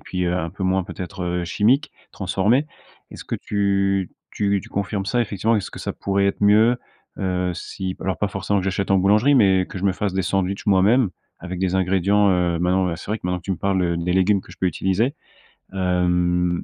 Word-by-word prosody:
puis 90 -1 -3
un 85 -2 -1
peu 95 0 -8
moins, 95 0 +1
peut-être, 90 0 -6
heu, 90 0 -2
chimiques, 120 - +2 0.2
transformés. 105 +9 +1 0.4
Est-ce - - -10
que - - -4
tu 100 -2 0 0.2
tu 100 -1 0
tu - - -12
confirmes 100 0 -2
ça? 120 +4 +1
Effectivement, 110 0 0
est-ce 100 - -3
que - - -10
ça - - -3
pourrait 100 0 0
être 100 - -1
mieux, 110 +4 +5 0.4
heu, 90 -1 -1
si 95 +2 -5
alors, 95 - -2
pas 105 - 0
forcément 100 +1 -1
que - - -5
j'achète 95 0 -2
en 95 - +4
boulangerie 105 +9 +4
mais 95 -7 +4
que - - -7
je 95 - -5
me 100 - +3
fasse 100 0 -2
des 95 - +1
sandwichs 95 +1 -1
moi-même? 100 +3 +4 0.3
Avec 90 +1 -6
des 95 0 0
ingrédients, 95 +2 +2
heu, 90 -2 +1
maintenant, 90 +2 +1
ben, 85 -2 -2
c'est 90 - -9
vrai 110 - -1
que, - - -6
maintenant, 90 0 -1
tu 90 - -6
me 95 - 0
parles, 95 -1 0
heu, 85 -1 0
les 85 +1 -1
légumes 95 +2 +3
que - - -17
je - - -15
peux - - -2
utiliser. 95 - 0 0.6
Hem, 90 -1 +1
95 Hz, 215 wpm, -22 LUFS, 90-100 Hz, 0.6 s, mieux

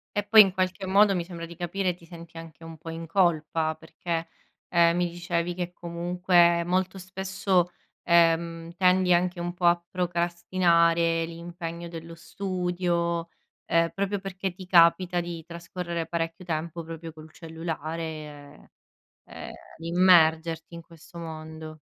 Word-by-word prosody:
E 205 - +1
poi, 215 +1 +9
in 190 -2 +3
qualche 185 0 -1
modo, 200 +1 +5
mi 175 - -1
sembra 170 -1 -7
di 170 0 -11
capire, 180 +2 -1
ti 170 -1 -18
senti 165 -1 -12
anche 165 0 -11
un 165 -1 -9
po' 165 +2 -9
in 165 0 -6
colpa, 160 -3 +1
perché, 165 +1 -4 0.4
ehm, 170 -1 +4
mi 175 0 +1
dicevi 175 0 -2
che 175 0 -4
comunque, 175 0 +2
molto 185 +2 0
spesso, 190 -1 0 0.3
ehm, 165 0 +2
tendi 180 0 +4
anche 175 0 +1
un 175 0 -3
po' 180 0 -3
a 170 0 +4
procrastinare 170 -1 +2
l'impegno 170 0 -7
dello 165 0 -9
studio, 175 -2 -2 0.4
ehm, 165 0 +2
proprio 200 +1 -1
perché 190 0 -4
ti 185 - -10
capita 175 0 +4
di 170 -1 -6
trascorrere 170 0 -5
parecchio 165 +1 -3
tempo, 165 0 -4
proprio 165 0 -8
col 155 0 -13
cellulare, 160 -3 -7 0.6
ehm, - - -9 0.3
di 165 +1 -7
immergerti 165 -2 +4
in 170 - -8
questo 165 +1 -15
mondo. 160 -1 -8
170 Hz, 140 wpm, -26 LUFS, 165-180 Hz, 0.6 s, poi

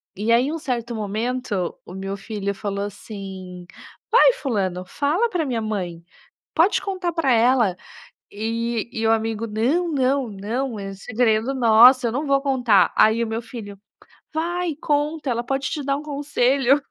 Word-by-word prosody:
E 215 +4 -1
aí 240 +3 +4
em 300 - -2
um 330 - -4
certo 240 -4 -3
momento, 215 -2 -2
o 180 - -10
meu 195 +1 -4
filho 200 0 -4
falou 200 0 -3
assim: 190 -3 -8 0.5
"Vai - - +6
fulano, 195 - -2
fala 315 - 0
pra 345 -6 -1
minha 240 -4 -2
mãe, 180 -6 -4 0.5
pode 340 +6 +3
contar 370 -3 -3
pra 320 -6 +1
ela". 230 -5 +3 0.6
E 230 +2 -2
e 225 0 -1
o 225 - +4
amigo: 225 0 -1
"Não, 250 +12 0
não, 270 -3 +1
não, 220 +4 -3
é 195 0 -6
segredo 225 +4 0
nosso, 245 +2 +6
eu 230 - +1
não 280 +4 -2
vou 275 0 +3
contar". 250 -7 +3
Aí 220 +2 +4
o - - -2
meu 225 +1 -3
filho: 215 -5 -9 0.6
"Vai, 340 +1 -1
conta! 295 0 -1
Ela 235 0 -1
pode 270 +1 -1
te 300 - -3
dar 275 0 0
um - - -7
conselho!" 280 -2 +2
235 Hz, 165 wpm, -22 LUFS, 210-275 Hz, 0.6 s, Vai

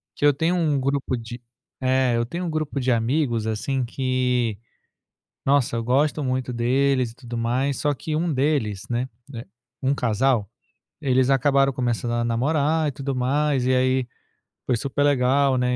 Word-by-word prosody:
Que - - 0
eu 145 - +6
tenho 165 +5 0
um 155 -5 +1
grupo 140 -1 -1
de 120 +1 -7 0.4
É. 130 -1 +2
Eu 115 - 0
tenho 170 +9 -5
um - - -2
grupo 155 -2 -3
de 130 0 +1
amigos 120 0 0
assim, 125 +4 -1
que 125 -3 0 0.9
nossa, 135 -4 +2
eu 115 - -2
gosto 145 +5 +1
muito 130 -1 -1
deles 130 +1 +1
e - - -19
tudo 120 -2 -7
mais, 125 +4 0
só 145 -1 0
que 155 +3 -4
um 165 0 0
deles, 120 -8 0
né 120 +1 -1 0.2
né, 120 -4 -7 0.4
um 135 - +2
casal, 120 -3 +1 0.5
eles 130 -2 +2
acabaram 135 +1 +3
começando 120 -2 -1
a 120 0 0
namorar 150 +6 +1
e 145 - -2
tudo 135 +1 -4
mais. 135 +1 +1
E 130 - +3
aí 130 0 +2 0.6
foi 125 - +2
super 140 +4 -2
legal, 135 -1 +3
né, 125 0 +1
130 Hz, 170 wpm, -23 LUFS, 120-140 Hz, 0.9 s, eu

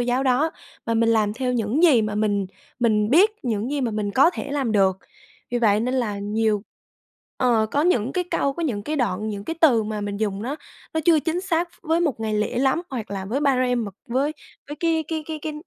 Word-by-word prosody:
giáo 245 +2 +1
đó, 270 +4 +2 0.4
mà 230 - 0
mình 230 0 +3
làm 215 -2 +2
theo 250 +1 -1
những 240 +5 0
gì 285 -10 +6
mà 210 -1 -2
mình 205 -2 0 0.3
mình 215 -2 +2
biết, 370 +10 +6
những 230 +1 -1
gì 290 - -1
mà 245 -3 0
mình 210 -1 -2
có 270 +10 +5
thể 285 -5 -6
làm 275 -6 -1
được. 190 -3 +3 0.5
Vì 245 - 0
vậy 210 -3 +3
nên 250 +3 -1
là 225 -6 -1
nhiều 210 0 0 0.7
ờ, 235 -4 +2
có 290 - +1
những 265 -8 +1
cái 360 - -1
câu, 280 - +1
có 340 - -5
những 230 -10 -2
cái 305 +8 -3
đoạn, 220 -5 -1
những 205 -1 -5
cái 330 +7 -4
từ 255 -9 +5
mà 215 0 -4
mình 205 0 -3
dùng 205 -1 -2
nó 275 +5 -3 0.4
nó 320 - +1
chưa 320 -3 +5
chính 330 +3 -1
xác 350 -2 0
với 325 0 +1
một 290 -9 0
ngày 220 -1 -1
lễ 210 +3 -1
lắm 270 +5 +2
hoặc 240 -7 -5
là 195 -1 -4
với 235 +8 -2
ba-rem 255 -4 +2
mà 205 - -5 0.2
với 270 +5 0 0.4
với 295 - -6
cái 325 -2 +1
cái 320 -1 -2
cái 315 -1 -5
cái 310 - -3
245 Hz, 235 wpm, -23 LUFS, 215-295 Hz, 0.7 s, gì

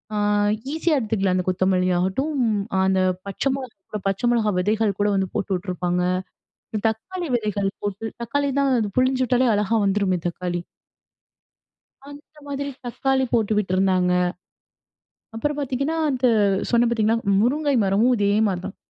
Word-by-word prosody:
அ - - -1 0.6
ஈஸியா 320 0 +1
எடுத்துக்கலாம். 200 -5 0
அந்த 180 - -1
கொத்தமல்லி 185 0 +1
ஆகட்டும், 230 - -1 0.5
அந்த 190 0 +2 0.3
பச்சை 235 +7 -1
மிளகாய் 255 -7 -8
கூட, 210 - -3
பச்சை 195 +5 -1
மிளகாய் 215 -5 +1
விதைகள் 210 +1 0
கூட 205 - +3
வந்து 190 -1 0
போட்டு 195 0 -1
விட்டுருப்பாங்க, 180 -1 -2 0.9
தக்காளி 335 +11 -5
விதைகள் 205 -3 -1
போட்டு 205 +2 -3 0.2
தக்காளி 280 +4 -1
தான் 275 -1 +2
அது 215 -2 -1
புழிஞ்சு 255 0 +2
விட்டாலே 250 0 +2
அழகா 210 +2 +1
வந்துருமே 195 -2 +1
தக்காளி. 175 0 -3 1.5
அந்த 290 +2 -14
மாரி 280 0 -4 0.2
தக்காளி 265 +2 0
போட்டு 220 -2 +2
விட்டுருந்தாங்க. 185 -2 +2 1.2
அப்புறம் 295 +6 -2
பாத்தீங்கன்னா 275 +3 -1
அந்த 255 -2 +1 0.4
சொன்னேன் 235 0 +3
பாத்தீங்களா 225 -1 +2 0.2
முருங்கை 285 +5 +1
மரமும் 205 +6 +3
இதே 200 -1 +2 0.2
மாரி 185 -3 -2
தான். 195 - -6
215 Hz, 135 wpm, -23 LUFS, 190-260 Hz, 1.5 s, கூட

